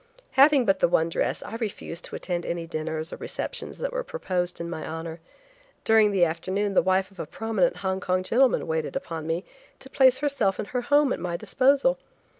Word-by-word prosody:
Having 275 -1 +5
but 195 -2 +2
the - - +4
one 165 -1 +2
dress - - -1
I 225 - -6
refused 205 -6 -5
to - - -7
attend 175 -2 -3
any 170 -1 -3
dinners 160 0 -4
or - - -6
receptions - - -4
that - - -3
were - - -2
proposed 180 - -3
in 170 - -4
my 160 -2 -5
honor. 165 +1 -6 0.6
During 220 -1 +5
the 190 -4 +3
afternoon 190 +5 -2
the - - +5
wife 190 +1 +1
of 190 - -19
a 155 - -4
prominent 215 -5 0
Hong 190 0 0
Kong 185 0 0
gentleman 250 +6 +3
waited 160 -1 -2
upon 165 - -4
me 165 +4 -2 0.3
to 265 - -13
place 260 -1 +5
herself 280 -10 0
and - - -5
her 250 - -1
home 285 +2 +3
at - - -4
my 175 -1 -3
disposal. 280 - +2
190 Hz, 205 wpm, -26 LUFS, 170-250 Hz, 0.6 s, Having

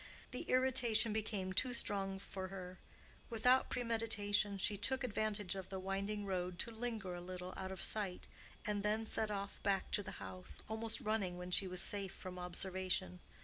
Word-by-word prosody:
The 250 - -3
irritation 245 -4 +4
became 205 -3 -1
too 250 +5 +2
strong 195 -3 0
for 190 -1 -5
her; 185 -1 -7 0.5
without 250 +3 +4
premeditation, 220 -4 +1
she 205 +2 +1
took 260 +6 +1
advantage 210 -4 0
of 190 -1 -5
the 190 - -3
winding 200 +2 -2
road 180 -2 -1
to 230 - -2
linger 220 -5 -3
a 175 - -5
little 180 0 -6
out 190 0 -4
of 190 - -3
sight, 200 -4 +1 0.4
and 210 -1 0
then 215 +2 +1
set 220 0 +3
off 200 -1 -4
back 195 -1 +1
to - - +3
the - - -7
house, 90 -5 -7
almost 220 0 -1
running 205 -5 0
when 180 0 -6
she 190 +1 +8
was 180 -1 +3
safe 200 -2 -2
from 180 -1 -7
observation. 180 - -2
200 Hz, 175 wpm, -38 LUFS, 185-220 Hz, 0.5 s, she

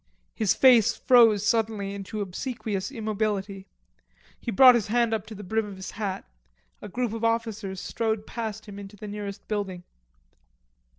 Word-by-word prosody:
His 215 -4 +1
face 245 -5 +5
froze 225 -5 +5
suddenly 220 -3 0
into 200 +2 -5
obsequious 205 0 -4
immobility. 210 -4 -3 0.7
He - - -6
brought 250 +4 +8
his 235 -5 0
hand 235 +1 +2
up 215 -1 -2
to 220 - -8
the 205 - -9
brim 220 +3 -1
of 200 - -8
his 190 0 -7
hat. 200 -3 -4 0.6
A - - -8
group 240 +2 -2
of 225 0 -5
officers 225 -4 -1
strode 220 0 -2
past 220 -2 -5
him 205 -2 -9
into 200 +1 -10
the 210 - -8
nearest 205 -1 -7
building. 195 -4 -3
215 Hz, 160 wpm, -26 LUFS, 200-225 Hz, 0.7 s, brought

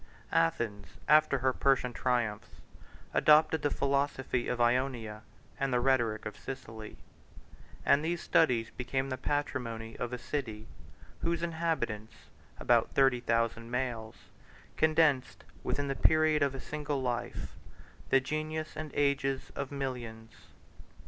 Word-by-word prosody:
Athens, 100 +5 +1 0.2
after 150 -2 +5
her 130 0 +1
Persian 130 -2 +2
triumphs, 120 -5 -1 0.6
adopted 155 +1 +5
the 145 - +1
philosophy 140 -3 0
of 125 - -2
Ionia 120 -3 0 0.4
and 135 -1 0
the 125 - +3
rhetoric 120 -4 +1
of 105 - -5
Sicily; 110 -5 -8 0.9
and 145 - +4
these 170 +2 -1
studies 120 -10 +2
became 130 +2 -2
the 130 - -3
patrimony 115 -6 -3
of 120 - -3
a 125 - -3
city, 120 -4 -4 0.6
whose 170 0 -1
inhabitants, 160 -11 -2 0.4
about - - +3
thirty 135 -2 +4
thousand 115 -1 0
males, 120 -3 -3 0.6
condensed, 155 -4 +2 0.2
within 145 0 -1
the 135 - 0
period 155 +1 +4
of 140 -1 +1
a - - -5
single 150 0 -3
life, 125 -2 -3 0.5
the 135 - +5
genius 155 +3 -3
of 155 0 -5
ages 140 -1 0
and 140 -1 -4
millions. 120 -5 -5
130 Hz, 125 wpm, -31 LUFS, 115-145 Hz, 0.9 s, after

